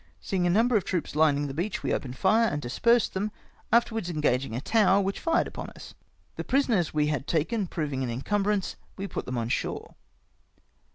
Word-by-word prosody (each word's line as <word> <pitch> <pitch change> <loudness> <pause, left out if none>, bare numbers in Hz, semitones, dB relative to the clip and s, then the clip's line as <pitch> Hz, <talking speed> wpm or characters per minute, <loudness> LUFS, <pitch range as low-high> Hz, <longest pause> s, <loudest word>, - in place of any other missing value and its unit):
Seeing 180 -2 -1
a - - +2
number 225 +6 +3
of 205 - +3
troops 175 -5 -3
lining 145 -2 +3
the 135 - -4
beach, 180 +7 -3
we - - 0
opened 130 -1 -3
fire 220 +4 +4
and 145 - -2
dispersed 230 - +2
them, 205 +3 -2 0.4
afterwards 225 -4 +2
engaging 135 -7 0
a - - -1
tower, 200 - +3
which 195 0 -1
fired 330 -1 +2
upon - - -7
us. - - -11 0.4
The - - -3
prisoners 240 - +1
we 150 -1 +1
had 150 -2 -2
taken 185 +6 0
proving 145 -6 -3
an 125 - -2
incumbrance, 200 - -1 0.2
we 195 - -4
put - - -5
them 125 0 -3
on 115 -1 -2
shore. - - -3
180 Hz, 190 wpm, -27 LUFS, 145-215 Hz, 0.4 s, fire